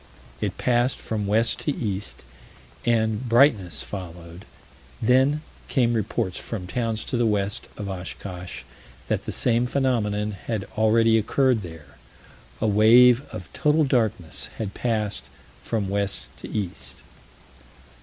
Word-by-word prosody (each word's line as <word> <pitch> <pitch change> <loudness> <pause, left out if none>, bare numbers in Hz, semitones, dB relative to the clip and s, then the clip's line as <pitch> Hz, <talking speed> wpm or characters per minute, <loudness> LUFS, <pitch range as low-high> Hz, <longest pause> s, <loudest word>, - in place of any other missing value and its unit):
It - - -2
passed 120 +1 +1
from 105 -2 -3
west 110 +3 +2
to 150 - -1
east, 100 -3 -4 0.6
and 110 +1 +1
brightness 105 - +4
followed: 85 +1 -8 0.5
then 130 +6 +3 0.2
came 120 -3 +2
reports 100 -4 -1
from 105 -6 -5
towns 115 +2 -2
to 125 - -2
the 120 - +2
west 105 -1 -1
of 105 - -5
Oshkosh: 90 -5 -7 0.5
that - - -1
the - - -1
same 120 0 +1
phenomenon 105 -6 0
had 100 +1 -4
already 110 +1 +4
occurred 125 +1 +2
there. 80 -5 -11 0.6
A - - 0
"wave 115 +4 +6
of 90 -2 -8
total 150 +1 +3
darkness" 110 - -1
had 105 -3 -4
passed 105 - -2 0.4
from 105 +5 -2
west 100 0 -1
to - - -9
east. 100 -5 -5
110 Hz, 125 wpm, -24 LUFS, 95-120 Hz, 0.6 s, wave